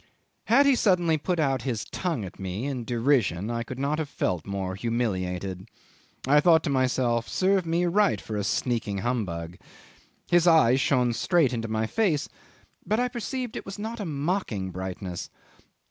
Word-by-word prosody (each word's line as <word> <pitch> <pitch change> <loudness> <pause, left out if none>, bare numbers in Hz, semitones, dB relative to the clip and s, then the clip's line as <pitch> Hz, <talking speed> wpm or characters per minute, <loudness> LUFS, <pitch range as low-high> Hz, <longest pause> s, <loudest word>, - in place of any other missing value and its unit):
'Had 270 +6 +5
he 280 - +5
suddenly 180 -9 +3
put 170 +3 -1
out 135 -4 +1
his 120 -5 -3
tongue 165 - -3
at 90 - -11
me 95 +5 -4
in 130 -4 -3
derision, 115 - +1
I 115 0 -2
could 120 +2 -6
not 140 +3 -1
have 155 -3 -3
felt 90 - -2
more 95 -1 -3
humiliated. 95 -4 -2 0.6
I 145 +2 +6
thought 160 0 +5
to 145 - -1
myself 125 -3 +1
Serve 190 -2 +1
me 170 +2 +1
right 190 - +2
for 105 +2 -6
a 105 - -1
sneaking 115 -1 -1
humbug.... 90 -8 -2 0.7
His 175 0 +4
eyes 135 -6 +5
shone 125 -6 +2
straight 145 +3 +2
into 115 -1 -2
my 110 0 -1
face, 165 - 0 0.6
but 215 +5 0
I 250 0 +1
perceived 245 0 -4
it - - -5
was 195 - -8
not 225 +3 -5
a 205 - -3
mocking 145 - -2
brightness. 90 -1 -5
130 Hz, 170 wpm, -26 LUFS, 105-175 Hz, 0.7 s, I